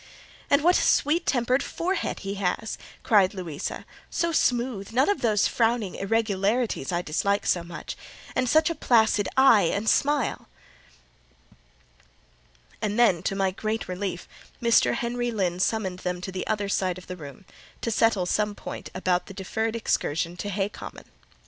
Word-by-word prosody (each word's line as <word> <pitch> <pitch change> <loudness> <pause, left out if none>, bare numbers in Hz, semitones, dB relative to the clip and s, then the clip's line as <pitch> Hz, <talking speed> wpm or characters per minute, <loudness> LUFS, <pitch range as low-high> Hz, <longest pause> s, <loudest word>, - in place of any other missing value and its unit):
"And 285 +1 +4
what 355 +2 +5
a - - +1
sweet 310 +4 +2
tempered 250 +1 +2
forehead 365 +7 -2
he 195 0 -4
has!" 200 +3 -2 0.2
cried 200 -3 +4
Louisa,—"so 180 - -4
smooth—none 245 -3 +1
of 405 - +1
those 215 -4 +3
frowning 225 -4 0
irregularities 210 - 0
I 175 0 -1
dislike 200 +6 0
so 175 - +2
much; 170 0 -7 0.4
and 255 -1 +1
such 315 +2 +4
a - - 0
placid 220 -8 +3
eye 230 -10 +6
and 205 +2 -2
smile!" 285 0 +1 2.3
And 210 0 -1
then, 205 -9 +4
to 195 - -2
my 195 -1 +1
great 215 +3 -3
relief, 185 -1 -4 0.3
Mr. 235 -1 +3
Henry 240 0 -2
Lynn 185 -6 -1
summoned 190 -2 0
them 180 -1 -3
to 190 - -5
the 185 0 -4
other 205 -2 -1
side 185 -2 0
of 185 - -11
the 180 - -6
room, 150 +3 -11 0.4
to 230 - -1
settle 220 -4 +2
some 210 +3 0
point - - -7
about 185 -1 0
the 195 - -10
deferred 220 +4 -2
excursion 170 -6 -1
to 205 - -4
Hay 195 0 0
Common. - - -10
210 Hz, 155 wpm, -26 LUFS, 185-235 Hz, 2.3 s, eye